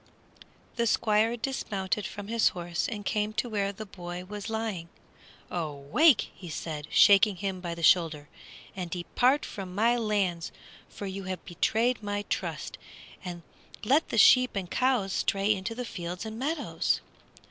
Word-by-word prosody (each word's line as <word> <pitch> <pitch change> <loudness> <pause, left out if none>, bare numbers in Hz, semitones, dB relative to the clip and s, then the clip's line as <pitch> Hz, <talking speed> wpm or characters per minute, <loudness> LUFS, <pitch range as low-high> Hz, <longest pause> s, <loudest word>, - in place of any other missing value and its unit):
The 235 0 +2
Squire 220 +1 +2
dismounted 210 -5 -2
from 205 -1 -8
his 230 0 +3
horse 175 -1 -2
and 210 -2 -5
came 210 0 0
to 245 - -1
where 200 -3 -1
the 215 +2 -8
boy 180 -2 -7
was 205 +2 -6
lying. 220 -7 -3 0.6
"Awake!" 165 - +2 0.2
said 155 -2 -5
he, - - -21
shaking 205 0 +6
him 190 0 -4
by 170 -2 -4
the 170 - -7
shoulder, 160 -4 +4 0.5
"and 180 -2 -4
depart 245 - +1
from 185 -2 -7
my 230 +4 +3
lands, 200 -7 0 0.4
for 205 - -7
you 195 0 -5
have 185 -1 -5
betrayed 225 +7 +1
my 205 0 -2
trust, - - -3 0.4
and 175 -2 -6 0.4
let 275 +8 +3
the - - -2
sheep 255 +2 +6
and 190 -2 -2
the - - -6
cows 250 -7 +2
stray 200 +2 +2
into 200 +3 -4
the 250 +1 -4
fields 180 -2 -5
and 220 +1 -6
meadows!" 305 +6 0
200 Hz, 160 wpm, -28 LUFS, 180-225 Hz, 0.6 s, shaking